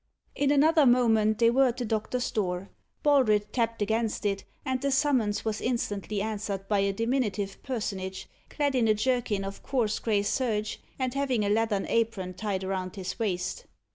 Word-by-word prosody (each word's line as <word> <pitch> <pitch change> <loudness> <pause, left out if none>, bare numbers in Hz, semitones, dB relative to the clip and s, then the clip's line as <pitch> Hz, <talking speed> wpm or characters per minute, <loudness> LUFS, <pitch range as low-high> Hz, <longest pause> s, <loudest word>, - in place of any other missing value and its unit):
In 285 -1 +1
another 295 +1 +5
moment 225 -3 +4
they 230 0 +4
were 265 +2 +4
at 245 0 -2
the 245 - -2
doctor's 225 +3 -1
door. 185 -2 -2 0.3
Baldred 235 -8 +3
tapped 230 -3 0
against 220 +1 -1
it, 195 -1 -1 0.2
and 260 -2 -1
the 280 - +1
summons 265 -8 +1
was 220 -1 -2
instantly 210 -4 -2
answered 205 -2 -4
by 205 -1 +2
a 200 0 +2
diminutive 210 -3 -1
personage, 195 -7 -4 0.2
clad 290 -2 0
in 245 -3 +2
a 215 - +4
jerkin 230 -3 0
of 195 0 -7
coarse 235 -6 0
grey 210 -3 +1
serge, 215 -1 -1 0.2
and 255 -2 -1
having 265 -6 0
a - - +1
leathern 210 -2 +1
apron 220 -5 0
tied 190 0 -3
round 190 -1 -3
his 190 +3 -5
waist. 200 - -2
220 Hz, 170 wpm, -28 LUFS, 200-250 Hz, 0.3 s, another